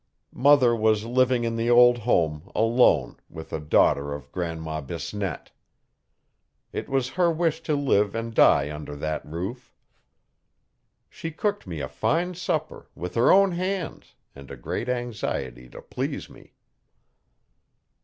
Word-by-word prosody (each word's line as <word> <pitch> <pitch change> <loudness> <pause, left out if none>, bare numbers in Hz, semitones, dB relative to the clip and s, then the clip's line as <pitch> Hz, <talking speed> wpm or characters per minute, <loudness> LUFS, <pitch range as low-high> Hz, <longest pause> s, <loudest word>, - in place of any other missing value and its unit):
Mother 130 -3 +5
was 110 -1 +1
living 125 0 +2
in 115 0 -1
the 115 +1 0
old 120 0 +6
home, 85 -7 0
alone, 115 +3 +3
with 80 0 -10
a - - -2
daughter 70 -1 +2
of 70 -3 -11
Grandma 80 -3 -4
Bisnette. 85 +4 -5 1.2
It - - -5
was 135 -2 0
her 175 +1 +2
wish 165 -1 0
to 155 -2 -1
live 105 -8 +1
and 115 0 -4
die 75 -8 +4
under 75 -1 -7
that 75 +1 -3
roof. 95 +11 -7 1.3
She 165 - -7
cooked 205 - -3
me 80 -4 -5
a - - -3
fine 175 +3 -1
supper, 180 - -3
with 90 0 -6
her 120 +1 +4
own 195 0 +5
hands, 185 0 -4 0.2
and 70 0 -13
a 70 - -8
great 115 - -4
anxiety 70 - -4
to - - -12
please - - -5
me. - - -18
115 Hz, 140 wpm, -25 LUFS, 80-135 Hz, 1.3 s, old